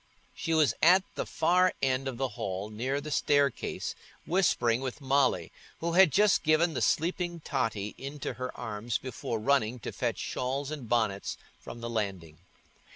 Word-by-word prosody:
She 165 - -1
was 150 -7 +4
at 180 +3 +6
the - - -4
far 180 +3 +3
end 135 0 0
of 130 -3 -4
the 135 0 -1
hall 100 0 -4
near 130 +6 -2
the 150 +1 -7
staircase, 145 -3 +1 0.3
whispering 130 -9 +2
with 130 0 -4
Molly, 135 - +1 0.3
who 170 +1 -1
had 180 -1 +6
just 205 +4 +4
given 160 +1 +3
the 130 - -2
sleeping 175 +1 0
Totty 115 -8 -2
into 140 0 -5
her 130 +1 -5
arms 115 -1 -2
before 120 -2 -4
running 125 -1 +2
to - - -5
fetch - - -2
shawls 135 +3 -3
and 140 -7 -6
bonnets 110 -5 0 0.2
from 120 - -9
the 115 - -4
landing. 95 -8 -3
130 Hz, 160 wpm, -29 LUFS, 115-155 Hz, 0.3 s, at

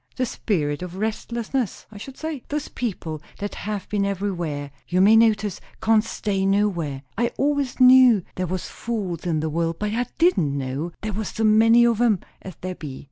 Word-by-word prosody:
"The 255 - 0
spirit 155 -11 -2
of 180 0 -6
restlessness, 230 +2 -3
I 210 - -10
should 270 +5 -9
say. 315 -4 -4
Those 295 0 -3
people 170 -10 -4 0.2
that 205 0 -4
have 210 -2 -5
been 205 -1 0
everywhere, 175 -8 -3 0.2
you 180 - +1
may 205 +4 +7
notice, 215 -3 +3 0.2
can't 220 -1 +3
stay 200 -3 -2
nowhere. 185 -9 0 0.2
I 235 0 +2
always 285 -2 0
knew 255 -5 +7
there 185 0 -3
was 185 +1 -3
fools 195 -7 -4
in 160 -3 0
the 160 - -1
world, 165 +1 -1
but 210 +2 -2
I 245 +1 -1
didn't 175 - +2
know 140 +5 -3
there 215 0 -3
was 215 0 -3
so 220 - -3
many 225 +2 +6
of 235 -1 +2
'em 220 -6 +3 0.2
as 185 -4 -9
there 185 0 -3
be. 145 -6 -8
205 Hz, 190 wpm, -23 LUFS, 175-230 Hz, 0.2 s, may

